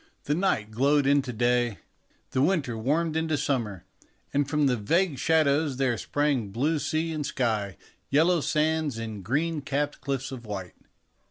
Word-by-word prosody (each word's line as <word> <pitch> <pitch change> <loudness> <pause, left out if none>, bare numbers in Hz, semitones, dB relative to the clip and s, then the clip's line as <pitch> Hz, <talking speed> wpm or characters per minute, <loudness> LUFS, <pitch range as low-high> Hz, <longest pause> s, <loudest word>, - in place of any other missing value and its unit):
The 145 - 0
night 155 - 0
glowed 140 +5 +3
into 140 -2 +2
day, 120 -1 +1 0.5
the 130 - +1
winter 145 -7 +1
warmed 155 +8 0
into 160 -1 0
summer, 120 - -2 0.5
and 140 -1 +1
from 150 -1 +2
the 130 -2 +3
vague 150 - +1
shadows 155 -3 +2
there 130 -3 +1
sprang 135 +3 0
blue 145 +10 0
sea 155 +3 -1
and 155 -1 -2
sky, 110 -8 -1 0.3
yellow 165 +4 +3
sands, 155 -3 0
and 110 -3 -6
green 150 - 0
capped 140 +2 -2
cliffs 135 0 -3
of 130 -3 -7
white. 100 -5 -6
140 Hz, 155 wpm, -27 LUFS, 120-155 Hz, 0.5 s, glowed